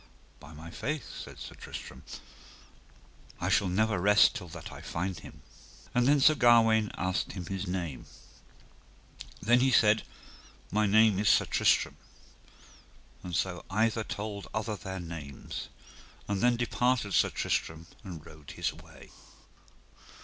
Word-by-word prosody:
By 80 0 -13
my 80 +2 -10
faith, 150 - -3 0.2
said - - -11
Sir - - -8
Tristram, - - -9 1.4
I 90 - -1
shall 100 +1 +3
never 105 +2 +1
rest 105 +3 +5
till 90 - -6
that 80 - -9
I - - -10
find 90 +2 -3
him. - - -13 0.5
And 125 0 +3
then 145 +1 +5
Sir 150 +3 +6
Gawaine 115 -5 +5
asked 95 0 -1
him 90 -2 -6
his 95 +2 -4
name. 85 -6 -4 1.4
Then 120 +3 +5
he 130 +1 +3
said: 110 -3 +4 0.7
My 105 +1 +2
name 110 -1 +5
is 105 -1 +3
Sir - - +5
Tristram. - - +2 1.2
And 90 -2 -5
so 90 -1 -1
either 110 +3 +1
told 105 -1 -5
other 110 0 -2
their 95 0 -6
names, 80 -5 -7 0.6
and 100 -1 -1
then 120 0 +4
departed 120 -3 0
Sir - - +4
Tristram 80 +1 -2 0.2
and 85 -6 -9
rode 75 -2 -13
his - - -2
way. - - -15
100 Hz, 140 wpm, -30 LUFS, 90-110 Hz, 1.4 s, Sir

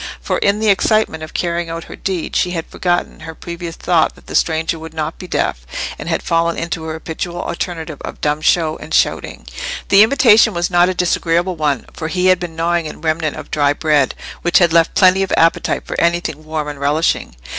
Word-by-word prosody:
For, - - -2
in 200 +1 +2
the 220 -1 +2
excitement 200 -4 +2
of 155 - -9
carrying 170 -1 -1
out 165 0 -5
her - - -10
deed, 185 -4 -3
she 180 - +2
had 170 -2 -3
forgotten 175 -1 -2
her 160 0 -9
previous 170 0 -7
thought 165 -3 +1
that - - -19
the - - -9
stranger 160 0 +1
would 160 0 -10
not 155 0 -3
be 185 - -8
deaf, - - -1 0.4
and - - -6
had - - -1
fallen 170 0 +1
into 165 -1 -3
her 160 - -4
habitual 165 +2 -5
alternative 165 -3 -5
of - - -7
dumb 150 +1 0
show 160 -1 +2
and - - -4
shouting. - - 0 0.4
The 195 - +7
invitation 225 -3 +5
was 175 +1 -1
not 175 +1 +4
a 185 - -2
disagreeable 175 0 +1
one, 150 -4 -1
for 160 - -5
he 180 +3 -1
had 185 - -5
been 175 -3 -6
gnawing 165 -1 0
a - - -14
remnant 155 -1 -1
of - - -9
dry 145 -1 +2
bread, 150 -3 +1 0.3
which 175 - +3
had 170 -3 +4
left 165 -1 +3
plenty 185 0 +5
of 195 - -1
appetite 165 0 +2
for - - -5
anything 170 -3 0
warm 155 -1 -3
and 145 -1 -6
relishing. 145 - 0
165 Hz, 210 wpm, -17 LUFS, 160-175 Hz, 0.4 s, The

